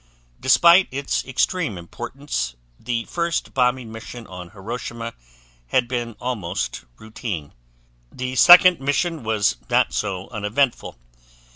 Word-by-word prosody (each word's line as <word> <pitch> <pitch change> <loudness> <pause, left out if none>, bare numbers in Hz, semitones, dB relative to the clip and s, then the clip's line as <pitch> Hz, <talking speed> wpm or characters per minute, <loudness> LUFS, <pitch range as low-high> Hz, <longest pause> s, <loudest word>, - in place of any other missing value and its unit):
Despite 170 +8 +6
its 140 +1 -2
extreme 130 - -1
importance, 90 - -5 0.2
the 120 -2 -3
first 170 -1 -2
bombing 125 -3 +1
mission 115 +1 -9
on 90 -2 -9
Hiroshima 115 +3 -6 0.5
had 120 - +1
been 120 -2 -3
almost 100 - -3
routine. 105 -8 -6 0.6
The 130 0 -5
second 175 +6 +8
mission 145 +4 -1
was 105 - +1
not - - +2
so 95 -3 -3
uneventful. 115 - -1
120 Hz, 110 wpm, -22 LUFS, 105-135 Hz, 0.6 s, second